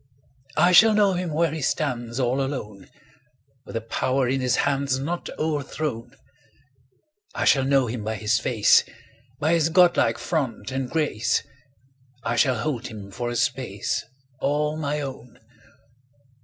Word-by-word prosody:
I 175 +4 +5
shall 215 +4 +7
know 205 -2 +4
him 180 -2 -2
where 160 +1 +1
he 160 0 -4
stands 125 -4 -2
All 130 +2 +1
alone, 105 -8 -5
10 - - -26 0.8
With - - -9
the 115 - -1
power 130 +3 0
in 135 +1 0
his 125 -1 +1
hands 140 -1 0
Not 165 +6 -4
o'erthrown; 145 -5 -3 1.2
I - - -1
shall 135 - +4
know 135 -1 +3
him 115 -2 -4
by 110 +1 -2
his 110 +1 +1
face, 110 -5 +4 0.6
By 155 +3 +2
his 165 -1 +2
godlike 175 +1 +4
front 135 -6 -3
and 130 -1 -3
grace; 150 -9 0 0.8
I 120 - -1
shall 125 +1 +3
hold 125 0 -3
him 105 -4 -9
for 120 +4 -4
a 120 - -4
space 120 -4 -1
15 - - -12 0.4
All 150 +1 0
my 150 -1 -2
own! 130 -3 -8
135 Hz, 155 wpm, -24 LUFS, 120-155 Hz, 1.2 s, shall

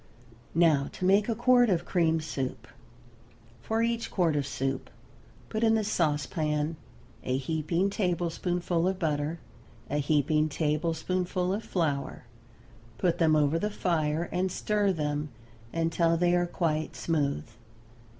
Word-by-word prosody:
Now 155 -5 +4
to 185 - -3
make 200 +4 +4
a 230 - +1
quart 245 0 +4
of 175 -2 +1
cream 165 -3 +2
soup: 130 -6 -4 0.9
For 225 - 0
each 235 0 -1
quart 170 -5 +1
of 140 -2 0
soup 135 -1 -3 0.6
put 220 +1 -2
in 225 -1 +4
the 220 - +1
sauce 155 -8 +1
pan 150 +1 -1 0.5
a 130 0 0
heaping 160 +7 0
tablespoonful 175 -2 0
of 190 0 0
butter, 155 -1 -1 0.5
a 145 - +1
heaping 150 +1 +2
tablespoonful 170 +4 -1
of 210 +3 -3
flour; 150 -9 -2 0.7
put 175 -1 +1
them 160 -2 +4
over 150 +2 +2
the 210 - -1
fire 165 -4 0
and 185 +1 0
stir 205 +1 +1
them 150 -3 -2 0.4
until 165 0 +1
they 175 +1 +2
are 175 0 +2
quite 155 -3 -1
smooth. 145 - -1
165 Hz, 135 wpm, -28 LUFS, 150-185 Hz, 0.9 s, Now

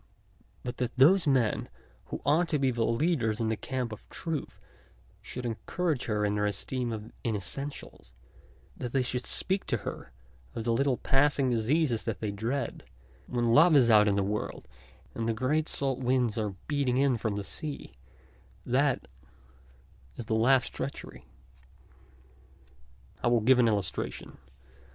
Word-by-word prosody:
But 125 0 -5
that 125 0 -3
those 165 +7 +6
men 130 -6 +2 0.4
who - - -7
ought 165 +4 +3
to 150 - +1
be 135 -2 +2
leaders 115 0 +1
in 115 -1 0
the 110 - +1
camp 125 0 -3
of 110 - -10
truth 165 -3 -5 0.6
should 125 -1 -6
encourage 140 - -2
her 105 -2 0
in 105 0 0
her 105 0 +1
esteem 120 +4 -2
of 110 0 -6
inessentials, 110 - -4 0.6
that 120 - -6
they, 135 -2 +2
should 125 0 -3
speak 190 +1 0
to 120 - +1
her - - -6 0.4
of 115 - -3
the 115 0 +1
little 135 +1 +2
passing 135 -1 +2
diseases 120 +2 +1
that - - -3
they 105 -2 -2
dread, 115 +7 -3 0.4
when 120 -1 +1
love 160 +4 +7
is 125 -4 +6
out 105 -1 +6
in 100 - +2
the 100 - +1
world 105 -8 -3 0.5
and 115 0 -2
the 115 - 0
great 150 +7 0
salt 135 -2 -1
winds 125 -3 +1
are 105 -4 -2
beating 140 -4 +1
in 135 -1 +3
from 110 -2 -2
the 100 - -3
sea, 150 - -6 0.7
that 135 +2 +1 1.1
is 120 - -6
the 110 - -2
last 125 +4 +3
treachery. - - -6 2.0
I - - +2
will 120 -1 +3
give 125 +3 +5
an 120 - +5
illustration. 100 -4 -2
125 Hz, 155 wpm, -29 LUFS, 110-140 Hz, 2.0 s, love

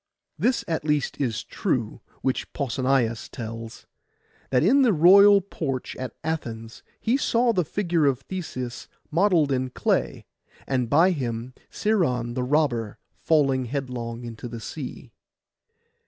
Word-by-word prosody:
This 250 0 +1
at 160 -3 -1
least 150 -2 -1
is 115 -5 -1
true, 125 - -2 0.2
which 130 - -1
Pausanias 130 -3 0
tells, 115 0 -7 0.6
that 125 0 +2
in 260 - +5
the 245 -5 +4
royal 200 +5 +7
porch 140 -9 -4
at 130 -2 -6
Athens 115 -8 -4 0.2
he 235 +4 +1
saw 240 -3 +2
the 180 -4 +2
figure 170 -3 0
of 135 -2 +1
Theseus 130 -10 -6 0.2
modelled 170 -4 +3
in 130 -1 0
clay, - - -1 0.4
and 125 -3 -1
by 165 +8 +5
him 125 -5 -3 0.2
Sciron 130 - 0
the 130 - -2
robber 125 -5 0 0.2
falling 135 -5 +2
headlong 125 -3 -4
into 115 +1 -7
the 120 -1 -7
sea. 125 0 -7
135 Hz, 130 wpm, -25 LUFS, 120-170 Hz, 0.6 s, royal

